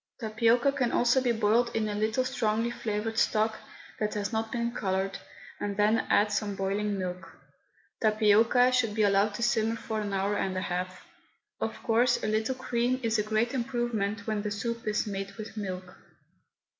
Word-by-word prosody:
Tapioca 230 +3 +2
can 250 -4 0
also 245 +2 +3
be 250 -2 +2
boiled 230 +2 +2
in 220 -1 +1
a 210 - -2
little 220 +5 0
strongly 230 -3 0
flavoured 220 0 -2
stock 215 0 +2 0.4
that 210 0 -1
has 205 +1 -2
not 220 0 -1
been 235 0 -1
coloured, 195 -2 -2 0.4
and 200 -1 -3
then 210 +2 +3
add 210 +1 +4
some 205 -2 -1
boiling 200 +1 -1
milk. 180 0 -6 0.6
Tapioca 220 +3 +4
should 230 -4 +1
be 220 - +2
allowed 200 +1 +3
to 235 - -3
simmer 225 -1 +2
for 220 -1 -4
an 205 -1 -3
hour 195 +1 0
and 190 -2 -1
a - - -1
half. 185 0 -4 0.5
Of - - -4
course, 240 +1 +2
a - - 0
little 220 +4 0
cream 250 0 0
is 225 -1 +1
a - - +4
great 220 +3 0
improvement 235 -5 -2
when 215 -2 -1
the 210 - -3
soup 230 +3 -4
is 210 - +1
made 195 -1 -4
with 215 +1 -8
milk. 185 -3 -5
215 Hz, 180 wpm, -29 LUFS, 205-235 Hz, 0.6 s, add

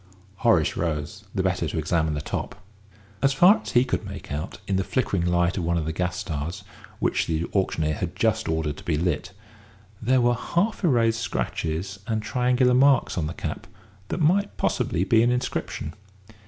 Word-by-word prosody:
Horace 100 - +3
rose, 85 +6 -3
the 95 - +1
better 90 -3 0
to 75 - -4
examine 80 0 0
the 75 - -2
top. - - -4 0.7
As 135 +2 +3
far 180 +10 +6
as - - -7
he 120 +1 +5
could 125 - -1
make - - -8
out 75 +5 -4
in 95 - +1
the 95 - +1
flickering 100 -6 0
light 85 +1 +1
of - - -2
one 85 +1 +1
of 80 - -1
the 80 - -2
gas 90 +2 -2
stars, 85 +5 -4 0.3
which - - 0
the 80 +1 0
auctioneer 80 -5 +1
had - - -4
just - - +1
ordered 80 -2 -1
to - - -11
be 80 -3 0
lit, 90 +3 -1 0.7
there 130 +3 +3
were 120 0 +3
half 175 - -1
erased 115 -8 +3
scratches 85 - -3
and 110 -1 -1
triangular 125 +2 +2
marks 135 0 +4
on 80 -4 -1
the 80 - -6
cap - - -5 0.4
that - - -3
might 185 +6 +2
possibly 85 - 0
be 110 +4 +4
an 120 - +3
inscription. 125 -9 -2
95 Hz, 185 wpm, -25 LUFS, 80-125 Hz, 0.7 s, far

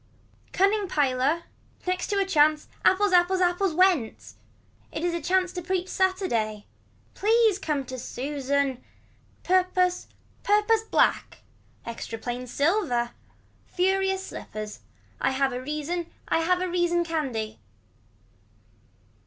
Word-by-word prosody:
Cunning 400 +1 +2
piler. 285 +2 +1 0.4
Next 365 0 -1
to 405 - -1
a 395 - +2
chance. 310 -4 +3 0.2
Apples. 400 +1 +3
Apples. 360 +1 +4
Apples 355 -1 +1
went. 355 -11 +2 0.6
It 315 - -4
was 350 -1 0
a 340 - -2
chance 365 +3 +1
to 360 - -4
preach 370 +1 -2
Saturday. 360 - 0 0.5
Please 440 -1 +3
come 295 -7 -2
to 255 0 -7
Susan. 275 0 -2 0.6
Purpose 365 0 +2 0.3
purpose 420 +2 +3
black. 445 - +1 0.4
Extra 230 -1 -6
plain 245 +2 -5
silver. 280 - +1 0.6
Furious 385 +1 0
slippers. 215 -1 -7 0.4
Have 265 0 +1
a 250 - -4
reason. 305 +5 -3 0.2
Have 360 +3 +2
a - - -1
reason 345 -1 +1
candy. 265 -10 -3
345 Hz, 110 wpm, -26 LUFS, 270-375 Hz, 0.6 s, Apples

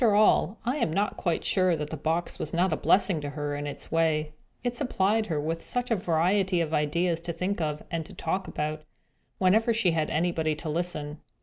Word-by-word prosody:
After 220 -4 +5
all, 210 0 +4
I 250 +5 0
am 165 - 0
not 200 +5 0
quite 170 -3 -1
sure 185 -3 +3
that 150 -1 -4
the - - -2
box 160 +3 -2
was 155 - -3
not 180 0 +2
a - - +2
blessing 185 -3 +3
to 145 - -4
her 145 0 -3
in 145 0 -4
its 145 - -7
way. 155 -2 +1 0.3
It 245 -1 -1
supplied 220 -4 +1
her 155 -4 -1
with 165 +3 -2
such 245 0 -2
a - - +5
variety 180 +1 +2
of 160 -2 -1
ideas 165 +3 +1
to 170 0 -3
think 180 +3 -2
of, 150 -1 -2
and 165 -1 -1
to - - -12
talk 185 +3 -2
about, 155 +1 -3 0.6
whenever 220 +5 +3
she 215 -6 +2
had 160 -2 0
anybody 160 -1 0
to 155 +1 -6
listen! 150 -2 -3
170 Hz, 215 wpm, -27 LUFS, 155-190 Hz, 0.6 s, After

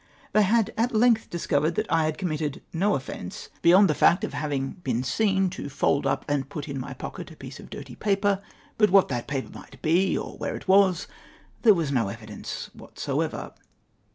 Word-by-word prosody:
They 215 - +5
had 220 +2 +2
at 235 0 +1
length 225 0 +3
discovered 160 -1 0
that 215 - 0
I 165 -1 +3
had 155 0 -1
committed 155 -6 -3
no 195 +5 +2
offence 110 -9 -6
beyond 185 +4 +7
the - - +2
fact 180 - +4
of - - -3
having 140 -3 -2
been 125 -5 -1
seen 195 +5 +2
to 145 - -6
fold 140 0 +1
up 135 0 -1
and 140 -2 -1
put 150 -2 -6
in 140 -2 -4
my 135 +1 -6
pocket 175 +7 -7
a 160 - -12
piece 135 -2 -10
of - - -12
dirty 140 -3 -8
paper, 200 - +1 0.4
but 210 - +5
what 195 0 +5
that 120 -3 -3
paper 135 -1 -3
might - - -13
be, 175 +4 +3
or - - -6
where - - -3
it - - -9
was, 190 -2 +4 0.6
there 215 -4 +7
Avas 160 -5 -1
no 120 -6 +1
evidence 105 0 -7
whatever. - - -4
160 Hz, 195 wpm, -26 LUFS, 135-195 Hz, 0.6 s, beyond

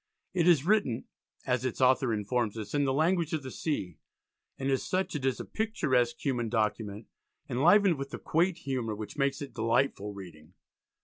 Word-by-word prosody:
It 175 -2 +2
is 160 -5 +5
written, 200 - +2 0.4
as 125 -1 0
its 130 -3 -3
author 130 -1 +4
informs 110 +1 -1
us, 110 -2 -6
in 145 -1 +2
"the 135 - +1
language 165 +2 +1
of 155 -3 -1
the 130 - -6
sea," 95 - -3 0.6
and 135 - -3
as 135 - +1
such 185 +1 -1
it 145 - -3
is 130 -2 0
a - - -5
picturesque 150 - 0
human 120 -5 0
document, 110 -2 -1 0.4
enlivened 175 +5 +4
with 140 0 -5
a - - -6
quaint 170 +2 +1
humour 125 -8 -3
which 105 0 -7
makes 140 0 0
it 140 - -9
delightful 115 -2 0
reading. 90 -3 -12
130 Hz, 180 wpm, -30 LUFS, 115-155 Hz, 0.6 s, is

